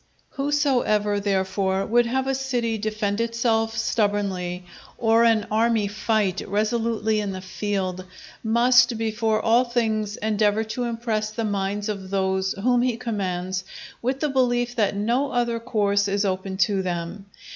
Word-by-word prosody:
Whosoever, 265 -8 +1
therefore, 190 -1 0
would 240 +2 +3
have 265 +2 0
a 270 - 0
city 245 -4 -1
defend 215 0 -1
itself 230 -1 0
stubbornly, 195 -4 -1 0.3
or 225 0 +4
an 225 -3 +3
army 220 -1 +2
fight 210 -2 0
resolutely 220 +1 0
in 205 -2 -2
the 185 - -5
field, 185 -1 -3 0.4
must 235 +1 +4
before 220 0 0
all 230 +3 +4
things 220 -4 -1
endeavour 215 0 +1
to 230 +3 -3
impress 230 -2 -2
the 225 +1 -3
minds 205 0 -2
of 195 -3 -4
those 190 0 0
whom 245 +4 +1
he 245 -2 0
commands 190 -5 -3 0.4
with 260 +3 -2
the 300 - +1
belief 245 -2 +1
that 210 -4 +1
no 240 +7 0
other 235 -1 0
course 205 -4 +1
is 200 +1 0
open 190 0 -2
to 190 +1 +2
them. 180 +2 -4
215 Hz, 145 wpm, -24 LUFS, 200-235 Hz, 0.4 s, or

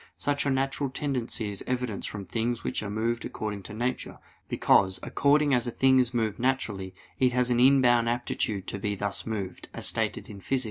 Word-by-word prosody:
Such 145 0 0
a - - +3
natural 135 +1 0
tendency 125 -6 -2
is 100 - -5
evidenced 125 -5 -2
from 100 -2 -6
things 115 +5 -2
which - - -1
are 105 - -4
moved 115 +3 -1
according 105 -2 -4
to - - -7
nature: 125 +3 -2 0.3
because 95 -1 +3
"according 145 0 +3
as 125 -1 +2
a - - +1
thing 130 +2 +4
is 125 -2 +2
moved 110 -4 -1
naturally, 105 -8 -1 0.2
it 125 -1 +3
has 125 0 +2
an 120 - +3
inborn 125 -3 +5
aptitude 115 -4 -1
to 100 - -4
be 100 +1 -1
thus 100 +2 -4
moved," 100 -5 -4
as - - -5
stated - - -1
in 100 - -9
Phys. 135 +6 0
120 Hz, 195 wpm, -28 LUFS, 105-130 Hz, 0.3 s, inborn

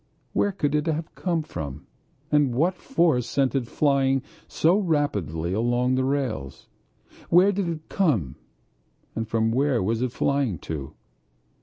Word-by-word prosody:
Where 205 - +2
could 150 -7 -1
it 150 +2 +1
have 160 0 -2
come 170 -4 -1
from 75 - -7 0.5
and 145 -5 +3
what 165 +8 +2
force 165 - +1
sent 135 -2 +1
it 130 -4 -1
flying 135 -1 +2 0.2
so 175 +6 +3
rapidly 100 - -1
along 120 +4 +1
the 130 0 +1
rails? 130 - -2 0.6
Where 185 +4 +6
did 195 -3 -1
it 160 -2 -6
come 125 - +1 0.9
from 110 0 0
and 115 0 +1
where 130 -3 +2
was 110 +4 0
it 125 -1 0
flying 140 - 0
to? 75 -4 -6
135 Hz, 145 wpm, -25 LUFS, 115-160 Hz, 0.9 s, Where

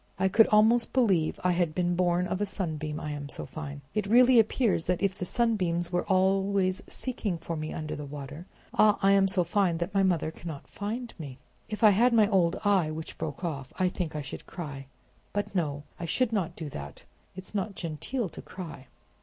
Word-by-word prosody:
"I 190 +1 +2
could 225 +4 +6
almost 220 +3 +4
believe 195 -11 +2
I 180 - +3
had 175 -3 0
been 175 -1 +1
born 180 0 +2
of 185 +2 -2
a - - +2
sunbeam, 155 -6 -3
I'm 145 -1 -5
so - - -4
fine! 145 -2 -7
It 215 -2 -1
really 245 +2 +6
appears 220 -5 +2
as 180 - +3
if 195 0 +1
the 180 - -4
sunbeams 180 -6 0
were 175 0 0
always 190 0 +2
seeking 220 -8 -3
for 165 0 -5
me 155 0 -4
under 155 -1 -4
the 150 -1 -6
water. 145 +4 -8 0.3
Ah! 210 -1 +5
I'm 195 0 +5
so 190 -2 +2
fine 175 -1 +1
that 170 +3 -3
my 195 - +3
mother 175 -5 +1
cannot 160 -3 -8
find 230 +4 -5
me. 140 -5 -7 0.3
If 215 +1 -4
I 215 - +9
had 235 +5 +4
my 220 -3 +5
old 180 -3 +2
eye, 195 -6 +3
which 155 +1 -7
broke 155 +3 -5
off, 140 -6 -4
I 185 -1 +2
think 175 -4 -4
I 150 - -3
should 140 - -8
cry; 140 -6 -7 0.5
but, 205 -1 -2
no, 145 -6 -1 0.2
I 170 - -3
should 230 +7 +1
not 190 -7 -1
do 160 - -5
that: 70 - -8 0.3
it's 185 +2 -8
not 200 0 -2
genteel 180 - -3
to - - -10
cry." 160 -8 -9
180 Hz, 205 wpm, -28 LUFS, 155-205 Hz, 0.5 s, I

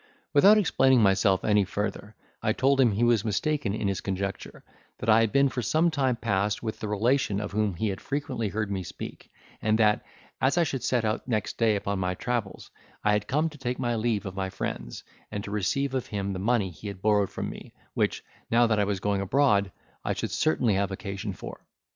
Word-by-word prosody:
Without 200 +9 +7
explaining 135 - +4
myself 95 -1 +3
any 105 -1 +4
further, 105 +2 -4 0.3
I 110 -1 +1
told 135 +3 +3
him 120 -5 +4
he 110 +4 0
was 120 -3 +3
mistaken 110 +1 -1
in 105 - -1
his 100 -1 -1
conjecture; 100 0 -4 0.3
that - - -3
I 110 - +6
had 115 -2 +1
been 140 0 +4
for 130 -2 -3
some 160 - +2
time 135 -5 +1
past 105 -2 -1
with 110 -1 -4
the 110 - -4
relation 105 0 +1
of 105 -1 -4
whom 105 -2 0
he 110 +5 -1
had 95 - -5
frequently 135 -6 -2
heard 105 0 -2
me 95 -1 -2
speak; 90 - -8 0.3
and 110 0 +2
that, 105 -1 +3 0.4
as 135 +6 +2
I 175 - +5
should 135 -5 -3
set 120 -3 +1
out 110 +3 -2
next 110 -5 -2
day 115 -2 +3
upon 100 -1 -2
my 90 0 -1
travels, 120 -1 -3 0.3
I 105 - +3
had 105 0 0
come 150 +4 +1
to 150 -2 -14
take 125 -1 -2
my 120 -2 -1
leave 110 -2 0
of 95 - -5
my 95 0 -3
friends, 60 -9 -5 0.3
and 105 -1 -4
to 100 - -7
receive 130 +7 0
of 130 -2 -2
him 100 -1 -3
the 95 - -4
money 105 -2 +1
he 90 +6 -10
had 100 -2 -7
borrowed 105 -2 +3
from - - -4
me, - - -11 0.2
which, - - 0 0.3
now 120 +1 +4
that 110 -2 +1
I 105 - +3
was 100 -1 -1
going 100 -1 0
abroad, 100 -3 +2 0.3
I - - 0
should - - -4
certainly 105 +8 +2
have 100 +1 +1
occasion 100 +1 -5
for. - - -9
105 Hz, 220 wpm, -27 LUFS, 100-125 Hz, 0.4 s, Without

